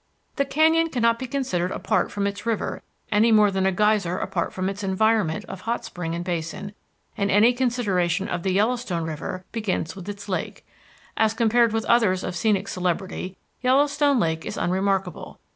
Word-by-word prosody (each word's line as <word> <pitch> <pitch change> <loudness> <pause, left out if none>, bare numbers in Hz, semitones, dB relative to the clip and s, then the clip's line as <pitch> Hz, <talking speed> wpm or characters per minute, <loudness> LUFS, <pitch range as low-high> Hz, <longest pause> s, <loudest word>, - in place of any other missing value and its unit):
The 280 - +2
canyon 320 +4 +3
cannot 230 -4 +1
be 260 - -4
considered 240 -10 -1
apart - - 0
from 200 -1 -2
its 200 0 -3
river 230 -2 -2 0.3
any 220 +3 +4
more 210 -2 +5
than 190 0 +1
a - - +3
geyser 205 -2 +2
apart 170 - -2
from 185 0 -3
its 200 +1 -4
environment 195 -3 +1
of 190 -1 -8
hot 235 +1 -2
spring 165 -2 -4
and 170 +1 -4
basin, 185 +4 -4 0.4
and 200 0 0
any 215 +5 +5
consideration 205 -8 0
of 175 - -3
the 190 - 0
Yellowstone 210 -4 0
River 160 +3 -5
begins 210 -7 -2
with 190 0 -8
its 205 0 -7
lake. 190 - -4 0.5
As 220 0 +2
compared 230 0 +3
with 225 0 -1
others 210 -6 +3
of 180 - -4
scenic 205 +1 +1
celebrity, 185 +1 -3 0.2
Yellowstone 285 +1 +3
Lake 160 -4 0
is - - -5
unremarkable. 190 -1 -1
200 Hz, 175 wpm, -24 LUFS, 185-230 Hz, 0.5 s, more